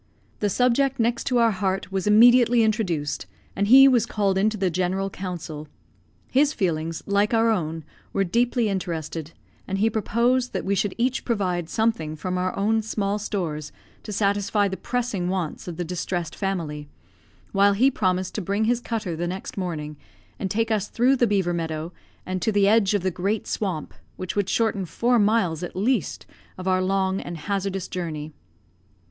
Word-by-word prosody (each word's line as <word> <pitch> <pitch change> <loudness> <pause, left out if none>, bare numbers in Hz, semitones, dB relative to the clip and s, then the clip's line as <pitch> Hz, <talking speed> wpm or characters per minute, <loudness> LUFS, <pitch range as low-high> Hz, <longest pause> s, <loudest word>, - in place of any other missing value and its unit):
The 205 - +1
subject 255 +5 +2
next 235 +1 +1
to 250 - +1
our 230 -1 +4
heart 190 -1 -2
was 195 +1 -2
immediately 240 +2 +6
introduced, 190 -10 -1 0.3
and 200 +1 0
he 270 +4 +9
was 240 -4 +3
called 200 -4 0
into 215 +3 +1
the 190 -2 0
general 185 +3 -1
council. 165 -5 -6 0.6
His 290 +3 +3
feelings, 165 - -2
like 205 +3 +2
our 225 0 +4
own, 165 -5 -2 0.3
were 195 - +1
deeply 235 +4 +1
interested; 165 -5 -3 0.4
and 195 - -2
he 220 +3 +2
proposed 240 +4 +1
that 190 - -3
we 195 - +1
should 195 0 0
each 255 +2 0
provide 180 -7 -1
something 220 -9 0
from 180 +3 -3
our 185 0 -2
own 220 +3 +2
small 210 -1 -2
stores 165 -8 -3 0.3
to 215 - -8
satisfy 205 0 +1
the 190 - -3
pressing 225 -6 -2
wants 180 -4 -3
of 170 -2 -6
the 175 - -2
distressed 175 0 -3
family; 160 -7 -3 0.6
while 200 0 +4
he 255 +7 +4
promised 185 -5 0
to 215 - -3
bring 200 +4 -1
his 235 +2 +2
cutter 220 -8 -3
the 175 +2 -2
next 185 +2 -6
morning, 155 -6 -4 0.4
and 190 - -2
take 225 +3 0
us 210 -2 0
through 250 +3 +3
the 240 -2 +2
beaver 190 -4 +1
meadow, 165 0 -3 0.3
and 185 0 -3
to 220 - +1
the 200 -1 +3
edge 210 -1 +4
of 200 - 0
the 185 - +1
great 195 +5 -1
swamp, 185 -7 -3 0.2
which 185 0 -5
would 200 -2 0
shorten 220 -4 +1
four 235 +8 +1
miles, 200 -6 +2
at 175 - -6
least, 230 +8 0 0.3
of 185 0 -6
our 185 0 +2
long 190 0 0
and 175 - -6
hazardous 195 +2 -2
journey. 155 -4 -5
195 Hz, 175 wpm, -24 LUFS, 180-220 Hz, 0.6 s, he